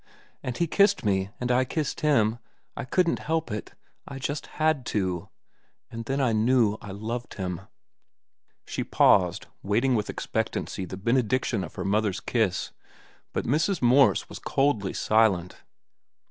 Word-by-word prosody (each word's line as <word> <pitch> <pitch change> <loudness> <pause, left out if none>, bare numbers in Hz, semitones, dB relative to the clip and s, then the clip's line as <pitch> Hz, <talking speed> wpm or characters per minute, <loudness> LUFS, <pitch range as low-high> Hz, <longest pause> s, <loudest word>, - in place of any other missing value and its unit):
And 125 -1 -4
he 170 - +2
kissed 200 - +3
me, 95 -1 +1
and 125 0 -1
I 125 +1 +4
kissed 150 +4 -3
him. 120 -7 +2 0.4
I - - -5
couldn't 175 +5 +1
help 160 -3 -2
it. 105 - -6 0.3
I 140 - -7
just 140 +2 -4
had 155 -3 +2
to. 90 -5 -2 0.6
And 115 0 -6
then 135 +3 -1
I 125 -4 +2
knew 110 -1 +3
I 100 - -9
loved 115 +5 -5
him." 90 -2 -4 1.0
She - - -3
paused, - - +3 0.2
waiting 115 +7 +1
with 105 -3 0
expectancy 95 - -3
the 95 +1 -7
benediction 115 0 +1
of 85 - -9
her - - -4
mother's 105 -1 +1
kiss, 110 -7 0 0.6
but - - -2
Mrs. 155 - +1
Morse 130 +2 +4
was - - -9
coldly 130 -9 0
silent. 105 -5 +2
115 Hz, 145 wpm, -26 LUFS, 100-135 Hz, 1.0 s, I